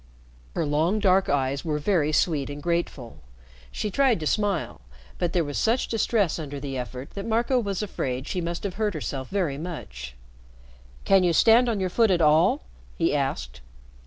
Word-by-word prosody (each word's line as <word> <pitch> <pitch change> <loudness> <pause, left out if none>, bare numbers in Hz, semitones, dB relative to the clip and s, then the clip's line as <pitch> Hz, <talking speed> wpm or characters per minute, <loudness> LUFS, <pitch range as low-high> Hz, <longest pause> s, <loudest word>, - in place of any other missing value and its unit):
Her - - 0
long, 155 +7 +1
dark 195 -2 +3
eyes 140 0 0
were 155 -3 -1
very 155 -1 +1
sweet 150 -3 +1
and 145 0 -6
grateful. 170 -7 -3 0.5
She 210 - -3
tried 260 -3 +3
to - - -3
smile, 200 - -1 0.4
but 175 - 0
there 175 - +1
was 145 -2 -3
such 230 +3 +1
distress 210 -6 +1
under 145 -2 -6
the 135 -1 -5
effort 125 +1 -6
that 200 - -6
Marco 235 +4 +1
was 200 -3 -2
afraid 130 -9 -3
she 180 - -2
must 170 0 -4
have 200 -3 -3
hurt 210 -4 0
herself 135 -3 -4
very 170 -8 -1
much. 65 - -7 0.9
"Can 195 -1 +5
you 175 -1 +3
stand 235 +7 +5
on 220 -3 -1
your 185 -1 -1
foot 225 +3 +3
at 180 -2 +3
all?" 155 - +4 0.3
he - - +1
asked. - - -2
170 Hz, 180 wpm, -25 LUFS, 145-200 Hz, 0.9 s, Can